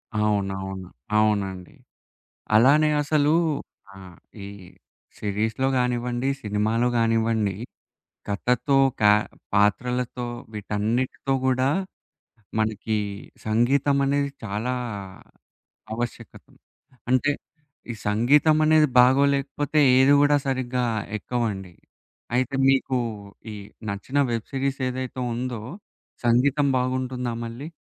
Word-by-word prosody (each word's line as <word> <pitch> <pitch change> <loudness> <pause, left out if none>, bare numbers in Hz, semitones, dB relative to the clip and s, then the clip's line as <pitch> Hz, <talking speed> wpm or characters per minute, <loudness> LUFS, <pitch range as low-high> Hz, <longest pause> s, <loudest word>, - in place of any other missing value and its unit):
అవునవును. 95 -3 -1 0.3
అవునండి. 100 -4 0 0.8
అలానే 145 +7 +5
అసలు 150 0 +2 0.6
ఆహ్, 95 -2 -13 0.3
ఈ - - -6 0.7
సిరీస్‌లో 110 +5 -1
గానివ్వండి, 125 0 -1
సినిమాలో 110 +3 0
గానివ్వండి. 115 -2 +1 0.7
కథతో, 125 +7 +1 0.2
క - - -10 0.5
పాత్రలతో 125 +4 +1 0.3
వీటన్నిటితో 110 +6 -2
కూడా 130 0 +2 0.9
మనకి 110 0 -1 0.5
సంగీతం 130 +6 +2
అనేది 140 +1 +1
చాలా 110 +4 -2 1.2
ఆవశ్యకతం. 120 +1 -7 0.5
అంటే 130 +3 +3 0.6
ఈ - - -5
సంగీతం 140 +9 +4
అనేది 155 0 +5
బాగోలేకపోతే, 140 +3 +3 0.2
ఏదీ 135 +2 +6
కూడా 145 0 +4
సరిగ్గా 130 -1 -1 0.3
ఎక్కవండి. 105 -5 -3 0.6
అయితే 130 +2 0
మీకు 135 -1 +2 0.6
ఈ - - -7 0.3
నచ్చిన 100 +8 -4
వెబ్ 115 -2 -3
సిరీస్ 135 0 -1
ఏదైతే 130 0 -5
ఉందో, 120 -1 -4 0.7
సంగీతం 135 +5 +3
బాగుంటుందా 125 -1 -2
మళ్ళీ? 120 +7 -7
125 Hz, 85 wpm, -24 LUFS, 105-135 Hz, 1.2 s, ఏదీ